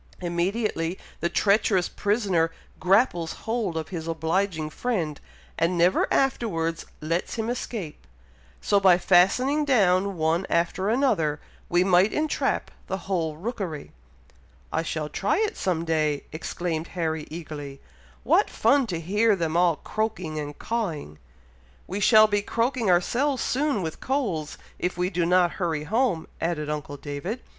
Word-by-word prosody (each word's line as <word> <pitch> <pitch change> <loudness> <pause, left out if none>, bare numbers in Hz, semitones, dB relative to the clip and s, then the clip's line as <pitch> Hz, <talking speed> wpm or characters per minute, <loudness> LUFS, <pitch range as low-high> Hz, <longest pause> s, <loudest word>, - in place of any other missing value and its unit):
Immediately 175 0 -1 0.2
the 170 - 0
treacherous 200 -2 +2
prisoner 200 -6 +1 0.3
grapples 180 -4 +2
hold 220 -7 -1
of 160 - -4
his 165 -3 -5
obliging 165 0 -1
friend, 175 - -2 0.4
and 170 +2 +1
never 175 +2 +3
afterwards 170 -11 0
lets 165 +3 -2
him 225 0 -2
escape; 210 -10 -6 0.5
so, 200 - +3
by 190 -3 +6
fastening 195 +12 +3
down 200 -8 +2
one 165 +3 +1
after 175 +3 +1
another, 215 - +1 0.3
we 175 +1 +3
might 185 +2 +4
entrap 310 0 -1 0.2
the 190 - -2
whole 165 -5 -1
rookery." 185 - -5 0.8
"I 160 - +1
shall 155 -2 -3
try 195 +6 0
it 435 +1 0
some 170 -3 -1
day!" 155 -3 0
exclaimed 165 +1 -3
Harry, 160 -2 -1
eagerly. 150 -4 -7 0.4
"What - - +3
fun 255 +3 +3
to 175 -5 -3
hear 205 +6 +2
them 165 -3 -2
all 175 -1 +4
croaking 185 -6 -3
and 145 -1 -6
cawing!" 165 - -3 0.7
"We 190 +3 -4
shall 215 +1 +7
be 205 -1 +1
croaking 230 +1 0
ourselves 250 +10 +2
soon 270 -7 0
with 160 -1 -5
colds, 200 - -2 0.2
if 180 - -2
we 180 +1 0
do 170 -2 0
not 180 -1 +4
hurry 160 -4 0
home," 215 - 0
added 150 -3 -1
uncle 145 -1 -5
David. 145 - -5
180 Hz, 140 wpm, -25 LUFS, 160-215 Hz, 0.8 s, shall